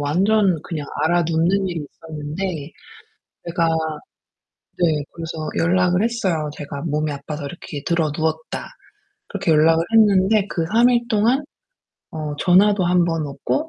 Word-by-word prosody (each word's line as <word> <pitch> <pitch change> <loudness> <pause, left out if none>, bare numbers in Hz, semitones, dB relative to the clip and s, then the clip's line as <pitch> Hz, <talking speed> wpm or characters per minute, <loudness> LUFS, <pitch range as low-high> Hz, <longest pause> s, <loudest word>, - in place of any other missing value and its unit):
완전 185 +4 +2
그냥 155 -4 -5 0.2
앓아눕는 170 +3 +2
일이 165 -4 -4
있었는데 155 +1 -6 0.8
제가 170 -1 +1 1.1
네 160 -4 +1
그래서 160 -2 -5
연락을 180 +2 +2
했어요. 190 -10 -1
"제가 140 -1 -6
몸이 155 -1 -1
아파서 145 +1 -6
이렇게 145 -1 -7
드러누웠다." 160 -1 -1 0.6
그렇게 195 -5 0
연락을 160 +2 +4
했는데 205 -1 +4
그 170 -3 -2
3 235 +2 +5
일 240 -1 +1
동안 230 +7 +2 0.7
어 155 -2 -4
전화도 195 +3 +4
1 175 0 +3
번 165 -3 -1
없고 290 - -2
170 Hz, 270 characters per minute, -21 LUFS, 155-195 Hz, 1.1 s, 3